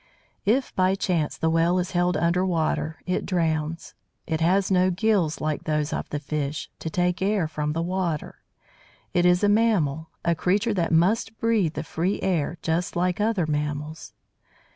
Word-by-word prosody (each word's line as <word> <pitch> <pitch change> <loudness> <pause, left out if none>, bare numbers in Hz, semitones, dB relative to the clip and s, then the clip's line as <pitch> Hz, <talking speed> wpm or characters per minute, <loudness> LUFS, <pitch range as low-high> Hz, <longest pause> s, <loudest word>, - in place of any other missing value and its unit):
If 255 +5 +1
by 185 +1 +3
chance 175 -6 -1
the 160 - +1
Whale 165 +2 +3
is 180 0 -1
held 175 0 +1
under 170 +2 +2
water, 160 -3 -1
it 180 - -1
drowns. 165 -2 -1 0.3
It 160 -1 -2
has 185 +4 +2
no 185 0 +4
gills, 185 -4 +1
like 155 -1 -2
those 150 -1 0
of - - -3
the 150 - -2
fish, 150 0 -3
to 160 - -4
take 180 +2 0
air 195 -3 +1
from 150 -1 -2
the 165 +1 -1
water; 175 -3 -3 0.7
it 175 0 +3
is 180 +2 +3
a - - +5
mammal, 185 -9 +2 0.2
a 170 - +3
creature 200 +7 +1
that 175 -4 0
must 210 +7 +2
breathe 215 -8 +1
the 150 - -3
free 170 +5 -1
air 170 -2 0
just 170 +2 -1
as 180 +1 +2
other 210 -5 +1
mammals. 150 +1 -3
175 Hz, 170 wpm, -25 LUFS, 155-185 Hz, 0.7 s, a